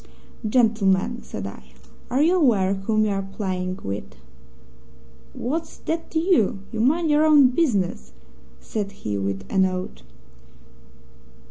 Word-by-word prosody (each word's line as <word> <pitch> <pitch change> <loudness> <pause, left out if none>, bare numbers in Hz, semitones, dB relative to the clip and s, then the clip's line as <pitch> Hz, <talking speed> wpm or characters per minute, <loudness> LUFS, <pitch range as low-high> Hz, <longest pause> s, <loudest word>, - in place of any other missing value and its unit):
"'Gentlemen,' 220 -1 +2
said 95 - -7
I, 65 -10 -10 0.4
'are 260 +4 +2
you 345 +4 +4
aware 210 - +3
whom 215 +2 0
you 210 - 0
are 195 0 -1
playing 185 -2 -4
with?' 65 -10 -5 1.2
"'What's 320 +7 -4
that 330 +1 -4
to 320 - 0
you? 315 - +2
You 225 - -4
mind 310 +7 +2
your 295 +1 +4
own 295 -4 +6
business!' 200 - 0 0.5
said 200 - -4
he, 105 -1 -2
with 95 0 -3
an 190 -1 +3
oath. 185 - -3
205 Hz, 130 wpm, -23 LUFS, 185-270 Hz, 1.2 s, own